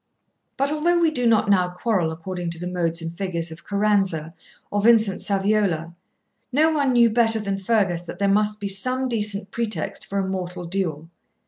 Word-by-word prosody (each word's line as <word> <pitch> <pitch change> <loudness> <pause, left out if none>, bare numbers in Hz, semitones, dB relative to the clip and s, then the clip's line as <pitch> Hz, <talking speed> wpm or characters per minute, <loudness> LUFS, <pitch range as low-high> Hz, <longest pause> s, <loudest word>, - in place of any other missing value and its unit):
But 275 +1 0
although 335 +3 +2
we 335 -2 +3
do 245 -5 0
not 220 -1 +3
now 185 -3 +3
quarrel 180 -2 -1
according 175 +2 -5
to 170 0 -5
the 175 - -5
modes 170 -2 -1
and 165 +1 -6
figures 170 -3 -3
of 160 +1 -11
Caranza 195 -6 0 0.4
or 205 - 0
Vincent 220 -3 +4
Saviola, 195 -5 0 0.6
no 310 +5 +3
one 285 -4 +1
knew 240 -1 +6
better 225 -1 +3
than 200 -2 -3
Fergus 190 -4 0
that 175 - -8
there 200 +1 +1
must 210 +1 +1
be 205 - -3
some 255 +7 0
decent 210 -4 0
pretext 215 -9 -3
for 200 - -3
a 195 -1 0
mortal 180 -1 -4
duel. 170 -4 -3
200 Hz, 185 wpm, -23 LUFS, 175-225 Hz, 0.6 s, knew